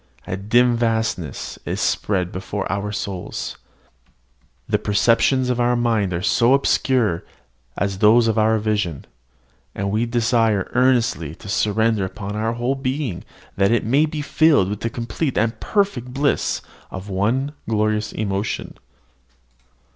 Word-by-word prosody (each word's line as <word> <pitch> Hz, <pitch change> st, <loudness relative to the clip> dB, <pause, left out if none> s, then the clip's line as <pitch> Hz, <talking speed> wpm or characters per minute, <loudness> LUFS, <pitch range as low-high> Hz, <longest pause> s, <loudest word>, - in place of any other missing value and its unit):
A -, -, -3 dB
dim 120 Hz, +5 st, +3 dB
vastness 110 Hz, -, -2 dB
is -, -, -3 dB
spread 95 Hz, -3 st, 0 dB
before 95 Hz, +2 st, -4 dB
our 100 Hz, +1 st, -2 dB
souls: 100 Hz, -3 st, -5 dB, 1.1 s
the -, -, +1 dB
perceptions 120 Hz, +5 st, +2 dB
of 125 Hz, -, -1 dB
our 120 Hz, 0 st, +2 dB
mind 115 Hz, -5 st, +1 dB
are 85 Hz, -, -1 dB
as 105 Hz, -, +1 dB
obscure 125 Hz, -6 st, +2 dB, 0.5 s
as 100 Hz, -1 st, -1 dB
those 115 Hz, +3 st, +5 dB
of 110 Hz, -, +1 dB
our 110 Hz, 0 st, +3 dB
vision; 105 Hz, -8 st, -1 dB, 0.7 s
and 100 Hz, 0 st, -2 dB
we 110 Hz, +3 st, 0 dB
desire 115 Hz, -4 st, +1 dB
earnestly 120 Hz, -, +2 dB
to -, -, -13 dB
surrender 105 Hz, +1 st, +1 dB
up 95 Hz, -, -9 dB
our 105 Hz, +3 st, -2 dB
whole 120 Hz, +3 st, -1 dB
being, 135 Hz, -, -3 dB, 0.3 s
that 100 Hz, +2 st, +3 dB
it 120 Hz, -, +1 dB
may 140 Hz, +7 st, +3 dB
be 150 Hz, -1 st, -4 dB
filled 145 Hz, -, +3 dB
with 105 Hz, -, -4 dB
the 115 Hz, -, -2 dB
complete 120 Hz, +5 st, -3 dB
and 115 Hz, +1 st, 0 dB
perfect 195 Hz, -, 0 dB
bliss 140 Hz, +2 st, 0 dB, 0.3 s
of 95 Hz, +1 st, -7 dB
one 110 Hz, +9 st, 0 dB, 0.2 s
glorious 110 Hz, 0 st, 0 dB
emotion. 100 Hz, 0 st, -3 dB
110 Hz, 140 wpm, -21 LUFS, 100-120 Hz, 1.1 s, those